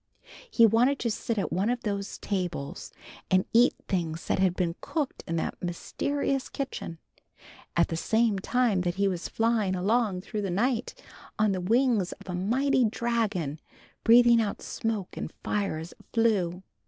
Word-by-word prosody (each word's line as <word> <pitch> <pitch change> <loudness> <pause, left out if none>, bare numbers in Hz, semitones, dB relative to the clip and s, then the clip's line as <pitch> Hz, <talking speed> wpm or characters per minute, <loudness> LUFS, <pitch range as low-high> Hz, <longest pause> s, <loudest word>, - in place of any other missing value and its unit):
He 235 - +6
wanted 240 +6 +4
to 235 - 0
sit 225 +1 -2
at 200 - -1
one 195 +5 +1
of 245 0 -1
those 200 -1 -3
tables, 180 -8 -4 0.4
and 185 0 +3
eat 240 +2 +5
things 165 -3 -2
that - - 0
had 185 -2 +3
been 175 -3 0
cooked 300 -5 -3
in 165 - -2
that 165 - -3
mysterious 270 +10 -2
kitchen, 270 -11 -5 0.8
at 170 - +4
the 165 - -2
same 220 +3 +1
time 230 -2 +1
that 175 -1 -1
he 200 0 +2
was 180 -3 -2
flying 225 -4 +1
along 200 0 +1
through 210 +2 -4
the 195 - -2
night 230 +7 0 0.4
on 215 -1 +3
the 185 -1 -1
wings 225 -1 +2
of - - -16
a 180 - -4
mighty 250 +9 +2
dragon 215 -10 -1 0.4
breathing 235 0 +7
out 205 -2 -3
smoke 220 -5 -3
and - - -4
fire 200 -6 -1
as 160 +2 -7
it - - -18
flew. 190 -6 +1
205 Hz, 165 wpm, -28 LUFS, 180-235 Hz, 0.8 s, breathing